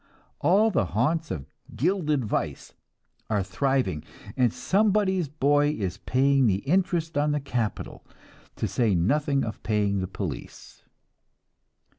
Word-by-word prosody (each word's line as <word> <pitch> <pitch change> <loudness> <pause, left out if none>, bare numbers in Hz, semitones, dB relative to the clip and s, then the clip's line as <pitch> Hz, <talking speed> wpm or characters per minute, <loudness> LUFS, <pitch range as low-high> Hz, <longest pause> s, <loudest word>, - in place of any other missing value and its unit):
All 200 +8 +4
the 100 - +1
haunts 160 +7 +1
of 70 - -4 0.3
"gilded 150 - +1
vice" - - -3 0.6
are 105 -3 +1
thriving, 95 - 0 0.3
and 125 -3 +3
somebody's 190 - +1
boy 145 0 +2
is 95 -3 -3
paying 135 0 +2
the 100 +2 0
interest 165 -2 +1
on 150 0 +1
the 150 - 0
capital, 120 -6 -3 0.5
to - - -2
say 115 -6 +1
nothing 140 - +1
of 110 - -5
paying 105 -2 0
the 95 - -2
police. 95 - -7
135 Hz, 125 wpm, -26 LUFS, 105-160 Hz, 0.6 s, All